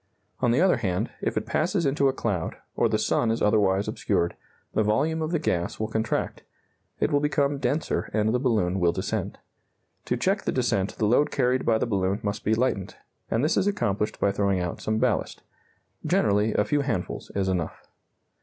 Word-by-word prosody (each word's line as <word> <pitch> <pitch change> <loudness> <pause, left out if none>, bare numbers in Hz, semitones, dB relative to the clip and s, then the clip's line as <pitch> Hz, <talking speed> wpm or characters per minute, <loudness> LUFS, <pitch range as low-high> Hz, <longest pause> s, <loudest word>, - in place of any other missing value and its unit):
On 125 - +2
the 125 +7 +3
other 185 -6 +4
hand, 95 -6 -1
if - - -1
it - - -1
passes 170 +1 0
into 140 0 +2
a - - +3
cloud, 100 -10 -2 0.2
or - - +2
the - - +2
sun 120 - +1
is 115 - 0
otherwise 100 -2 +2
obscured, 85 0 0 0.4
the - - +2
volume 140 +10 +1
of 155 - -1
the 170 - +1
gas 90 - -1
will 110 0 -2
contract; 110 0 -2 0.6
it - - +1
will 145 - +3
become 145 -1 +1
denser, 150 +2 -1
and 110 +1 +1
the 125 - +2
balloon 105 -8 +1
will 85 -1 +3
descend. - - -3 0.7
To 125 - 0
check 195 - +1
the - - -1
descent 115 -6 0
the 110 - +1
load 125 +7 +3
carried 130 -1 +1
by 115 - +4
the - - 0
balloon 100 -3 0
must 100 0 -3
be 110 - +2
lightened, 115 -6 -1 0.3
and 115 +3 +1
this 155 - +2
is 195 - +2
accomplished 105 - -1
by 100 - +2
throwing 100 -1 +1
out 90 -1 -3
some 110 0 -1
ballast; - - 0 0.6
generally, 105 +2 +2
a 105 - +3
few 145 -1 +1
handfuls 115 -10 -3
is 100 -1 0
enough. 90 -4 -2
110 Hz, 195 wpm, -26 LUFS, 100-140 Hz, 0.7 s, other